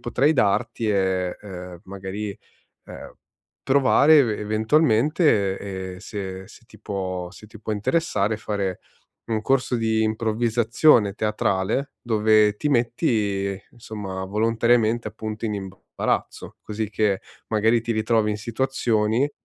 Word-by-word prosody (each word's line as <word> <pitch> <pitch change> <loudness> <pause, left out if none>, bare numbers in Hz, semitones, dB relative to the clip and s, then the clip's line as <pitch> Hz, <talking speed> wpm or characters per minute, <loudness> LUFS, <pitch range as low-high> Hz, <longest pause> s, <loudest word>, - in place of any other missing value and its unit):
potrei 135 +6 +2
darti 115 +1 +1
è, 95 -2 0
uhm, 90 -3 -9
magari, 100 +2 -6 0.5
ehm, - - -10 0.5
provare 140 +3 +5
eve 115 -7 +2
eventualmente 110 - +2 0.4
e - - -13
se 95 -2 -6
se 115 - -16
ti 110 - -18
può 95 -4 -4
se 105 +2 -14
ti 110 0 -14
può 110 - -3
interessare, 105 -2 0
fare 100 -4 -3 0.5
un 110 -2 -1
corso 130 -1 +1
di 110 -1 +1
improvvisazione 110 +1 +2
teatrale, 105 +4 -1
dove 110 -2 +3
ti 150 - -1
metti 105 - 0
insomma 105 -5 -6
volontariamente, 115 +2 +1
appunto, 110 +1 -6
in 105 - -1
imbarazzo, 95 -1 -4
così 105 0 -4
che 105 -3 +1 0.3
magari 110 +2 +2
ti 115 - -1
ritrovi 110 0 +1
in 105 - -3
situazioni 115 +1 0
110 Hz, 120 wpm, -23 LUFS, 100-115 Hz, 0.5 s, provare